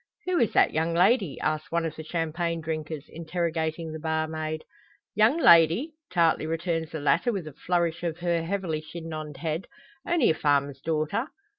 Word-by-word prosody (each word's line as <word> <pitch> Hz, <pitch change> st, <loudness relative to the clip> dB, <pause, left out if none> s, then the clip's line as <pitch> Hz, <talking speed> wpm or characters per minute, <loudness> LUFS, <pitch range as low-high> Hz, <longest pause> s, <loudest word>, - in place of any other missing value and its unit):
"Who 365 Hz, -1 st, +1 dB
is 230 Hz, -5 st, +2 dB
that -, -, +4 dB
young 165 Hz, +2 st, 0 dB
lady?" 190 Hz, -, +3 dB
asks 155 Hz, 0 st, -1 dB
one 170 Hz, 0 st, +1 dB
of 160 Hz, -2 st, -4 dB
the 160 Hz, -, -7 dB
champagne 165 Hz, +1 st, -2 dB
drinkers, 155 Hz, -2 st, -4 dB
interrogating 165 Hz, -1 st, -3 dB
the 160 Hz, -, -6 dB
barmaid. 160 Hz, 0 st, -2 dB, 0.5 s
"Young 220 Hz, +8 st, +4 dB
lady!" 170 Hz, -, +5 dB, 0.2 s
tartly 165 Hz, -3 st, +2 dB
returns 165 Hz, 0 st, -2 dB
the 160 Hz, -, -5 dB
latter, 150 Hz, -, +2 dB
with 195 Hz, -7 st, -3 dB
a 155 Hz, -, -8 dB
flourish 170 Hz, +2 st, -1 dB
of 170 Hz, -2 st, -2 dB
her 170 Hz, -1 st, 0 dB
heavily 170 Hz, -3 st, -2 dB
chignoned 155 Hz, -2 st, -7 dB
head, 160 Hz, +4 st, -3 dB, 0.4 s
"only 340 Hz, -, +3 dB
a -, -, +2 dB
farmer's 140 Hz, -3 st, +1 dB
daughter." 160 Hz, -, -1 dB
165 Hz, 165 wpm, -27 LUFS, 155-175 Hz, 0.5 s, lady